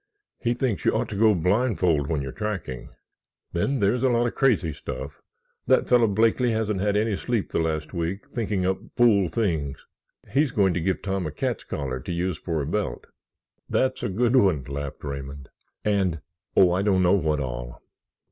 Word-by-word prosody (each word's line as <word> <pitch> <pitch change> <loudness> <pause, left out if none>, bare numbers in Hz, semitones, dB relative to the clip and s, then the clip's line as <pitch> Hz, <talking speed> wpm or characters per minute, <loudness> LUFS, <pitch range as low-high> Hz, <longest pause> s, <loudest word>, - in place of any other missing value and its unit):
He 120 0 0
thinks 125 -4 -1
you - - +3
ought - - -1
to 105 - -5
go 110 +1 +4
blindfold 90 - +1
when 75 -3 -1
you're 65 - -5
tracking. 95 - -4 0.6
Then 135 +11 0
there's 115 +2 +2
a 130 - +3
lot 120 0 +2
of 120 - -1
crazy 105 - +2
stuff—that 65 0 -3
fellow 120 -2 +5
Blakeley 115 +4 +2
hasn't 110 -3 0
had 105 0 +1
any 110 -1 +1
sleep 115 +1 -2
the - - 0
last 80 -1 -2
week 90 +7 -3
thinking 105 -8 -2
up 95 0 0 0.2
fool 105 -6 +4
things. 80 -7 -2 0.5
He's 145 +2 +3
going 95 -5 +2
to 90 - -1
give 95 +2 -1
Tom 95 -3 -1
a - - -4
cat's 75 - -3
collar 65 -3 -3
to 75 - -6
use 85 -1 -2
for 80 -3 -2
a - - -4
belt." 80 -6 -2 0.6
"That's 130 0 +1
a - - -1
good 120 +6 +1
one," 95 - +4
laughed 70 +1 -6
Raymond. 70 -1 -6 0.4
"And—oh, 90 -2 +1
I 90 +2 +1
don't 95 -2 +2
know 90 +1 +4
what 80 -6 +1
all. - - -5
95 Hz, 180 wpm, -25 LUFS, 80-110 Hz, 0.6 s, fellow